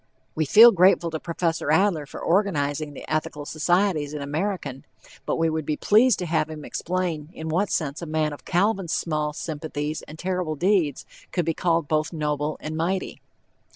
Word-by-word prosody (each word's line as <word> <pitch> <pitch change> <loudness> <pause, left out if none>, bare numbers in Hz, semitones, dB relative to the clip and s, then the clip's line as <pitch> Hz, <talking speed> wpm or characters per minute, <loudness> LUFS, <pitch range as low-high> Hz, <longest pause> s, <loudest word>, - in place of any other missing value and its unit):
We 155 - 0
feel 225 +10 +9
grateful 180 -3 +4
to 160 - -3
Prof. 170 0 -2
Adler 160 -1 +2
for - - -9
organizing 155 -6 0
the - - -8
Ethical 150 -1 -2
Societies 155 -1 0
in 150 - -4
American, 145 -3 -3 0.4
but - - +1
we 165 - +1
would 160 0 -1
be 150 +1 -2
pleased 225 +2 +4
to 180 - -3
have 160 -2 0
him 155 -2 -8
explain 170 -4 -3
in 160 0 -6
what 185 +6 +1
sense 150 -1 -2
a 170 - -5
man 155 -1 0
of 145 - -11
Calvin's 195 -1 0
small 150 -2 -1
sympathies 150 -1 -4
and 155 - -10
terrible 180 -3 -2
deeds 175 -4 +1 0.3
could 175 -3 0
be 165 - +1
called 165 -2 0
both 155 0 0
"noble 150 -1 -2
and 155 +1 -5
mighty." 180 +4 -2
160 Hz, 180 wpm, -24 LUFS, 150-180 Hz, 0.4 s, feel